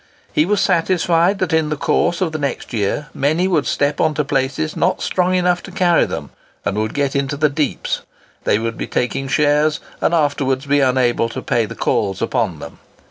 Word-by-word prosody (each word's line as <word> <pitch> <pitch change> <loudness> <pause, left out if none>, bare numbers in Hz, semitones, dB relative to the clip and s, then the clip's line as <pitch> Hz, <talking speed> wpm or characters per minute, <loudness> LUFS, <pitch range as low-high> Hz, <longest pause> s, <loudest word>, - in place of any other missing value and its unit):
He 155 - +2
was 205 0 +2
satisfied 175 +2 +2
that 185 -3 -1
in 160 -1 +2
the 155 - -1
course 165 +3 +1
of 175 -4 +1
the 155 - -4
next 140 -3 -3
year 115 +7 -1
many 160 +6 +1
would 165 -6 +1
step 145 0 0
on 155 -1 +2
to 150 - 0
places 140 +3 -1
not - - +1
strong 185 0 +1
enough 180 -1 +2
to 195 - -10
carry 175 -2 +3
them, - - -6 0.3
and - - 0
would 110 0 -2
get 140 -1 0
into 140 +1 -1
the 150 +1 +3
deeps; 145 -1 -2 0.4
they - - +2
would 115 +1 -3
be - - -3
taking 130 +2 -1
shares, 150 +2 +2 0.2
and - - +2
afterwards 145 -4 +1
be 145 +1 +2
unable 125 -3 +2
to - - -6
pay 115 -2 +1
the - - -8
calls 95 -3 0
upon 115 -7 -1
them. - - -10
145 Hz, 200 wpm, -19 LUFS, 130-165 Hz, 0.4 s, carry